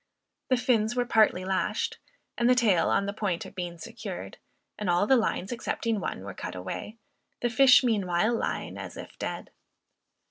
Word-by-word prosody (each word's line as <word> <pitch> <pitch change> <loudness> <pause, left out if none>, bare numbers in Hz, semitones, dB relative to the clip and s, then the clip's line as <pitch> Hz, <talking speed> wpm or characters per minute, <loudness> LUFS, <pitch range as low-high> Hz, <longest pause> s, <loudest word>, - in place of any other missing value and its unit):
The 255 - +4
fins 235 -2 +1
were 245 -1 +1
partly 215 -6 +3
lashed, 190 0 -1 0.4
and 240 0 +2
the 250 - +6
tail 215 -8 +3
on 200 - +2
the 200 - -3
point 195 -5 -2
of - - -11
being 175 -2 -5
secured, 160 - -7 0.4
and 210 - -2
all 175 +3 +3
the 265 - +5
lines 220 -4 0
excepting 230 -2 -2
one, 140 - -4
were 100 -1 -7
cut 90 - -6
away, 95 - -6 0.4
the 240 - 0
fish 265 +1 +7
meanwhile 210 -2 +1
lying 230 - -3
as - - -7
if - - -10
dead. - - -5
215 Hz, 175 wpm, -28 LUFS, 180-240 Hz, 0.4 s, fish